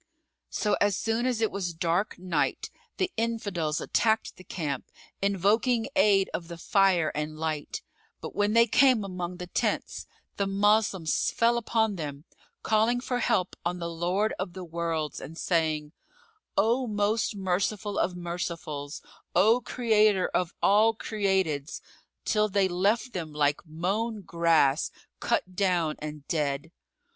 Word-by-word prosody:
So, 210 -1 0
as 205 -1 +3
soon 230 +2 0
as 245 -3 0
it 220 - +2
was 180 -4 -3
dark 170 +5 0
Night, 175 -5 -1 0.3
the 375 -1 0
Infidels 200 -9 -1
attacked 220 -1 +1
the 185 - -14
camp, 150 -8 -4 0.3
invoking 215 +5 +2
aid 200 -8 +4
of 170 - -4
the 170 0 -8
fire 185 -3 +3
and 150 +1 -4
light; 160 - -3 0.4
but - - -7
when 205 +1 +1
they 230 0 +6
came 250 -1 +4
among 180 -2 -5
the 180 - -6
tents, 180 - -2 0.3
the 200 - 0
Moslems 200 -4 +2
fell 235 +1 +2
upon 220 -3 0
them, 145 -1 -6 0.4
calling 220 +3 +2
for 245 0 -2
help 185 -5 +1
on 175 +1 -1
the 170 -1 -4
Lord 180 +6 0
of 175 - -3
the 185 0 -7
Worlds 165 -2 -3
and 165 - -9
saying, 155 -4 0 0.7
"O 235 +6 +2
Most 210 +1 0
Merciful 195 +2 -1
of 180 - 0
Mercifuls, 170 -4 -5 0.3
O 225 +5 +5
Creator 215 -6 +2
of 180 -1 0
all 220 +3 +5
createds!" 190 -10 -1 0.5
till 215 -1 +2
they 195 -1 +2
left 205 +7 0
them 160 -4 -5
like 145 -1 +1
mown 200 +8 -2
grass, 165 -4 +2 0.3
cut 185 0 -1
down 175 -5 +1
and 150 -1 -7
dead. 145 0 -1
190 Hz, 140 wpm, -28 LUFS, 165-215 Hz, 0.7 s, they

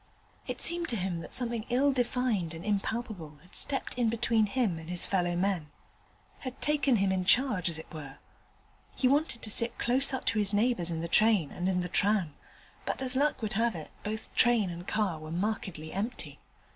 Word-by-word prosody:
It - - -4
seemed 345 -1 0
to 235 - +3
him 185 -4 -2
that 165 - -9
something 235 -3 +2
ill 270 +3 +3
defined 240 -9 0
and 165 +4 -9
impalpable 205 -6 -3
had 180 - -8
stepped 275 - +2
in 235 -2 +3
between 225 -1 +2
him 200 -6 0
and 160 +1 -10
his 180 -1 -1
fellow 175 -2 0
men 180 -4 -1 0.7
had 255 -1 -7
taken 290 -3 +2
him 195 -2 +2
in 185 -1 0
charge, 210 -4 +2
as 165 - -4
it 160 - -8
were. 145 -3 -8 0.8
He 255 - +2
wanted 280 -3 +1
to 215 - 0
sit 230 +2 +2
close 260 +4 +3
up 260 - -4
to 220 - +1
his 205 0 +4
neighbours 210 -5 +2
in 165 -1 -3
the 170 - -3
train 210 -4 +4
and 180 +1 -2
in 180 -1 +1
the 180 - -3
tram, 195 -4 +1 0.5
but - - -3
as 260 -1 0
luck 285 -2 +1
would 215 - -2
have 225 0 +1
it 160 -2 -8
both 215 +1 -5
train 230 -6 +3
and 175 +1 -8
car 200 -7 0
were 155 0 -9
markedly 180 -4 -3
empty. 215 +6 -4
210 Hz, 200 wpm, -29 LUFS, 175-240 Hz, 0.8 s, his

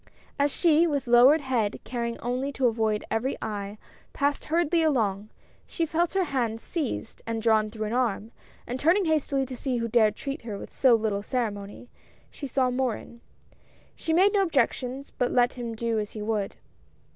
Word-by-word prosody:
As 285 +1 +3
she, 335 +1 +4
with 285 -4 -1
lowered 250 +6 +6
head, 240 -7 -1
caring 235 -1 -3
only 250 +3 -2
to 260 0 0
avoid 220 -2 +1
every 235 +5 -1
eye, 205 -1 -5 0.4
passed 285 0 0
hurriedly 335 +1 +2
along, 215 -9 +1 0.4
she 330 - -1
felt 335 +3 0
her 385 - +3
hand 240 -8 -1
seized 285 -6 -4
and 230 -1 -2
drawn 220 -1 +3
through 215 0 -5
an 215 - -3
arm, 230 -3 0 0.3
and 250 +2 -4
turning 355 +7 +3
hastily 290 -4 +1
to 260 0 -7
see 255 0 -2
who 230 0 -1
dared 220 -2 +3
treat 275 +5 -5
her 220 -3 -6
with - - -10
so 255 -3 +5
little 215 -3 -1
ceremony, 205 -2 -4 0.4
she 280 - -7
saw 255 -1 +1
Morin. 245 -2 -3 0.7
She 325 - -3
made 380 +5 +4
no 405 - +4
objection, 275 -6 0 0.2
but 245 - +1
let 245 -1 +3
him 235 -2 -5
do 230 0 -1
as 210 -1 -5
he 215 - -6
would. 210 -2 -2
245 Hz, 180 wpm, -26 LUFS, 220-280 Hz, 0.7 s, lowered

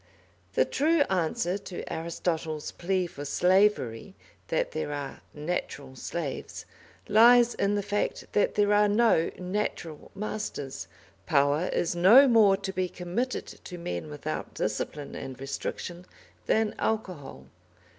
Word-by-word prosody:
The - - +3
true 315 +3 +2
answer 175 +1 0
to 190 -3 -7
Aristotle's 160 -1 -3
plea 185 +1 -1
for 145 -4 -8
slavery, 185 - +2 0.3
that - - 0
there 150 - -3
are 145 -2 -5
"natural 150 -4 -4
slaves," 145 +2 -5 0.4
lies 240 +3 +6
in 200 +1 0
the 205 - -1
fact 205 +1 -2
that 205 - +1
there 205 0 +3
are 210 0 +5
no 205 -5 +3
"natural" 180 -4 -4
masters. 195 - -5 0.4
Power 145 +4 +3
is 175 - -1
no 220 +11 +8
more 215 -5 +5
to 195 -1 -5
be 185 -1 -1
committed 185 +10 -3
to 180 - -10
men 85 - -5
without 75 - -5
discipline 145 -2 -3
and 130 -1 -7
restriction 170 +6 -5 0.4
than 220 -1 +2
alcohol. 185 -10 -3
180 Hz, 125 wpm, -28 LUFS, 150-210 Hz, 0.4 s, no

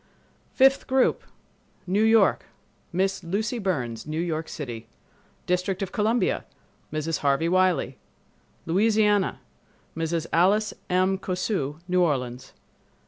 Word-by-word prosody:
Fifth 270 +1 +4
Group 265 -1 +2 0.6
New 190 +3 +1
York—Miss 195 -3 0
Lucy 215 +7 -2
Burns, 130 - -3
New 155 +1 -3
York 165 -2 -2
City. 120 -6 -7 0.6
District 180 +2 -1
of 190 - -5
Columbia—Mrs. 210 -8 -2
Harvey 140 +3 +1
Wiley. 180 -7 +1 0.7
Louisiana—Mrs. 190 -4 -1
Alice 200 +5 +3 0.2
M. 185 +1 +2
Cosu, 180 -6 -2
New 180 0 +2
Orleans. 130 -6 -1
180 Hz, 90 wpm, -25 LUFS, 155-205 Hz, 0.7 s, Fifth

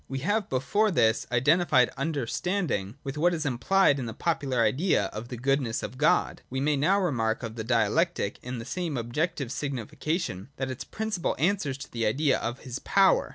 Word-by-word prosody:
We 135 - -4
have 205 +1 0
before 205 +12 +1
this 110 - +2
(§ - - -28
80) 120 - -1
identified 145 -1 +4
Understanding 140 - -2
with 140 +1 -5
what 175 +2 +3
is 160 -2 -3
implied 145 +4 +3
in 125 - -3
the 115 - -6
popular 140 -7 0
idea 140 - +2
of 110 +2 -6
the 125 - -6
goodness 130 -2 0
of 130 - -6
God; 150 - +2
we 130 - -3
may 150 +2 +2
now 160 +9 +3
remark 120 - 0
of 115 -1 -4
Dialectic, 115 - 0
in 125 0 -5
the 115 - -6
same 165 0 -3
objective 130 +3 -2
sig 140 0 -3
nification, 125 - -3
that 135 -1 -3
its 130 - -6
principle 215 -5 -2
answers 155 -4 0
to 140 - -10
the 115 -2 0
idea 135 +5 +2
of 120 +3 -4
his 130 0 -6
power. 195 -1 +3
135 Hz, 195 wpm, -27 LUFS, 120-170 Hz, -, identified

